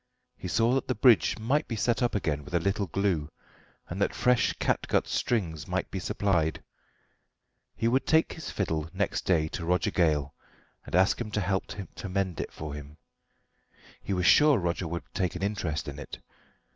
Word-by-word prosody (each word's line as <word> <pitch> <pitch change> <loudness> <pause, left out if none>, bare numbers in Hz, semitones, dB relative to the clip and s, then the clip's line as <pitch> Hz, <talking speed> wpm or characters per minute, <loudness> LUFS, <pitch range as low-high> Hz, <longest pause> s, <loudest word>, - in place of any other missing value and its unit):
He - - -7
saw 115 +6 +2
that 135 - 0
the 130 - 0
bridge 120 -5 +5
might 135 +8 0
be 115 - -3
set 115 +4 +1
up 120 -2 +1
again 75 -7 -1
with 90 -1 -6
a - - +4
little 100 +3 0
glue, 90 -5 0 0.6
and - - -5
that - - +1
fresh 125 -1 +3
catgut - - 0
strings 85 -11 -1
might - - -2
be - - -3
supplied. 85 -6 0 1.1
He 115 - 0
would 130 +3 +1
take 160 +1 +3
his 160 - -7
fiddle 80 -5 -2
next 100 +1 -1
day 80 -4 +3
to 85 - -5
Roger 90 +2 +1
Gale 75 -5 +1 0.5
and - - -3
ask 95 +5 +3
him 115 - -3
to 105 - -1
help 95 0 -1
to 95 0 -7
mend 95 -2 -1
it - - -6
for 75 -2 -6
him. 75 +1 -9 1.0
He - - -5
was 90 -2 0
sure 150 +3 +6
Roger 85 -1 -1
would 85 +1 -4
take 90 -2 -1
an 90 - -4
interest 85 -7 -2
in 70 0 -6
it. 75 - -8
95 Hz, 185 wpm, -28 LUFS, 80-110 Hz, 1.1 s, sure